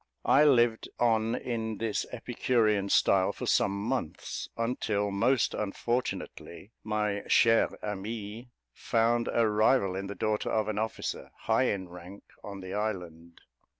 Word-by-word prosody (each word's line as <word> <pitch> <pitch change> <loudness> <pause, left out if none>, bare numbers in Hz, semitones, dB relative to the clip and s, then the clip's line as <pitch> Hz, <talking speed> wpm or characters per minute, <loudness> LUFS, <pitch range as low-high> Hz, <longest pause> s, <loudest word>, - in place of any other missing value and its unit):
I 145 - +5
lived 120 -5 +3
on 115 -1 +2
in 110 -3 -3
this 110 -1 -2
Epicurean 115 -4 0
style 95 -1 +3
for - - -6
some - - +3
months; 115 -5 -4
until, 110 -3 -1
most 120 +6 +2
unfortunately, 105 -2 -4
my 105 -1 -1
chère 115 -1 +4
amie 105 +3 -5 0.2
found 115 +1 +1
a 115 -1 +3
rival 105 -2 +2
in 100 +1 -4
the 100 - -6
daughter 110 -1 -1
of 110 -1 0
an 105 -1 -2
officer, 110 +1 -4
high 115 +3 +2
in 95 -6 -1
rank, 90 +3 -11 0.2
on 100 -1 -7
the 95 0 -7
island. 90 -6 -5
110 Hz, 135 wpm, -29 LUFS, 100-115 Hz, 0.2 s, I